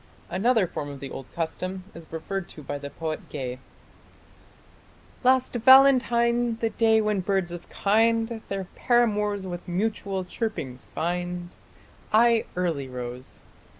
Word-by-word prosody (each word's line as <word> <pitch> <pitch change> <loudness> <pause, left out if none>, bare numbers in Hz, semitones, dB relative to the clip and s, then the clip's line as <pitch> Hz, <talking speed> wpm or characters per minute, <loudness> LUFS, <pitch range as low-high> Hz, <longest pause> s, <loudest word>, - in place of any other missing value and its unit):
Another 220 +2 +3
form 150 -4 -5
of 140 -1 -8
the 135 -1 -7
old 135 - -8
custom 185 +3 -3
is 165 -1 -12
referred 180 +3 -4
to 150 - -11
by 145 +1 -4
the 140 0 -6
poet 155 +1 -5
Gay: 130 -3 -5 1.6
Last 255 0 +3
Valentine, 240 -2 +5
the 225 -1 -1
day 220 -1 +4
when 210 -2 +1
birds 190 -2 0
of 175 0 -8
kind 225 +2 +2
Their 195 -1 -2
paramours 210 -5 +1
with 175 -1 -6
mutual 195 0 -2
chirpings 165 - -4
find, 175 +1 -3 0.6
I 230 +1 +5
early 165 -7 -1
rose.... 125 0 -8
190 Hz, 130 wpm, -26 LUFS, 165-225 Hz, 1.6 s, Valentine